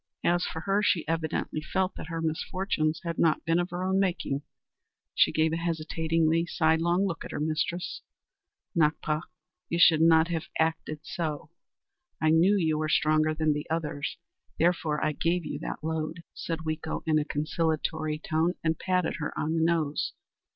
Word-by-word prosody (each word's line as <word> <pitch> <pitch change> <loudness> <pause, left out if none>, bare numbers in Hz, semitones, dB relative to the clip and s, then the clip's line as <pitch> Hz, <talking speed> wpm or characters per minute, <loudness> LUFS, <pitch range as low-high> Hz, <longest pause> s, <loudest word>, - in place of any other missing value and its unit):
As 175 +1 +2
for 160 - -5
her, 200 +3 +1
she 175 -6 +1
evidently 160 -1 -1
felt 185 +4 -1
that - - -8
her 165 -1 -4
misfortunes 160 0 -1
had 170 -1 -3
not 160 -2 +2
been 165 +1 +2
of 175 +1 -1
her 175 +1 -4
own 190 +1 +2
making. 170 -7 0 0.7
She - - +4
gave 160 0 +2
a - - 0
hesitating, 165 -1 0 0.2
sidelong 170 +3 +2
look 170 -4 -3
at - - -8
her - - -4
mistress. 160 +3 -2 0.7
"Nakpa, 155 -1 +1 0.5
you 170 - 0
should 165 -2 +6
not 165 0 +5
have 170 -1 -2
acted 160 -1 -1
so. 160 -3 -4 0.7
I 155 0 +3
knew 180 +6 +5
you 160 -4 +1
were 155 0 -1
stronger 155 0 +3
than 155 -1 +2
the 150 0 -5
others, 155 -3 -2 0.4
therefore 165 -3 +1
I 155 - +2
gave 170 +3 0
you - - -4
that - - -5
load," 160 +1 -3
said 165 -1 -4
Weeko 155 0 -3
in 155 -1 +3
a - - +1
conciliatory 155 0 -1
tone, 160 +3 0
and 160 -1 0
patted 180 -2 0
her 150 - -2
on 155 +2 -1
the 165 - +1
nose. 160 -3 +1
160 Hz, 170 wpm, -28 LUFS, 155-170 Hz, 0.7 s, should